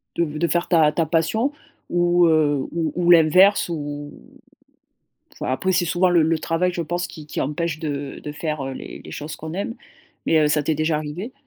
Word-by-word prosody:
de 170 - +1
de 170 +2 +1
faire 175 +1 0
ta 160 -4 +4
ta 165 +2 0
passion? 170 - +1 0.4
Ou 175 0 +3
heu, 150 -4 +2
ou 165 -2 -1
ou 175 0 +3
l'inverse? 175 +5 +6
Où 145 -2 -5 1.2
enfin, - - -4
après, 185 +7 0
c'est 175 -1 +2
souvent 180 +2 +2
le 175 -2 +4
le 160 0 +1
travail 165 +3 0
je 170 - -2
pense 175 +2 -2
qui 155 -3 -11
qui - - -3
empêche 155 +2 -2
de 145 -3 -4
de 150 - -5
faire, 150 -2 -4
heu, 135 - -4
les - - -9
les - - -11
choses 150 +1 -6
qu'on 160 +1 -7
aime 200 +5 -3 0.5
mais 160 - +4
heu, 150 - +3
ça 150 0 +1
t'est 155 - 0
déjà 155 +1 0
arrivé? 155 - -6
160 Hz, 205 wpm, -22 LUFS, 150-175 Hz, 1.2 s, l'inverse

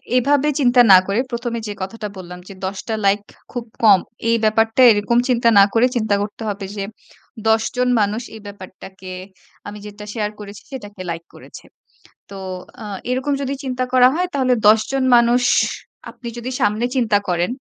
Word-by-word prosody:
এ - - +6
এভাবে 285 +3 +2
চিন্তা 245 -2 +5
না 185 - +10
করে, 200 +3 0
১ম 235 0 -3
এ - - -8
যে 205 - -4
কথাটা 210 +3 -5
বললাম, 180 -1 -9
যে - - -9
১০ 190 +1 -4
টা 225 - -2
লাইক 200 +1 +3 0.3
খুব 245 -2 -5 0.2
কম, 200 -4 +7 0.3
এই 230 - +4
ব্যাপারটা, 225 +3 +2
এরকম 210 +3 +1
চিন্তা 235 -1 +3
না - - +9
করে, 230 +2 +4
চিন্তা 215 -3 +1
করতে 205 +2 -6
হবে 200 -1 -5
যে, 200 - -2 0.7
১০ 220 0 +3
জন 250 0 +2
মানুষ 210 +3 -1
এই 220 - -11
ব্যাপারটাকে, 190 -1 -11 0.6
আমি 205 - -8
যেটা 210 0 -10
শেয়ার 210 -2 -2
করেছি, 205 0 -10
সেটাকে 205 -7 -9
লাইক 165 0 -6
করেছে। - - -13 0.7
তো - - -9 0.5
আ - - -7 0.3
এরকম 260 +3 -1
যদি 275 +1 -2
চিন্তা 255 -1 -2
করা 250 -1 +6
হয়, 360 +3 0
তাহলে 255 -2 +2
১০ 220 0 +6
জন 270 -1 0
মানুষ, 240 +1 +3 0.7
আপনি 240 - -10
যদি 240 +2 -5
সামনে 215 -1 +1
চিন্তা 225 -5 +2
করেন, 175 +1 0
220 Hz, 185 wpm, -19 LUFS, 205-250 Hz, 0.7 s, না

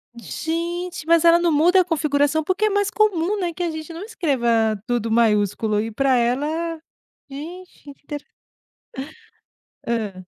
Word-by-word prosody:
Gente! 340 +7 -4
Mas 335 0 +4
ela 335 0 +7
não 345 -1 +2
muda 345 +5 +5
a - - -1
configuração. 300 -2 +1
Porque 375 +6 0
é - - +3
mais 405 0 +1
comum, 410 -1 +1
né, 345 -2 -2
que 355 - -4
a 345 - 0
gente 315 +1 -7
não 340 +4 -7
escreva 235 - 0
tudo 235 -2 -1
maiúsculo 215 -1 +2
e 225 +1 -2
pra 265 +3 +2
ela 305 +7 0 0.5
gente! 345 +7 -9
Que 290 - -12
intere 290 +1 -9 1.6
Hã? 210 -6 -2
310 Hz, 150 wpm, -22 LUFS, 235-345 Hz, 1.6 s, ela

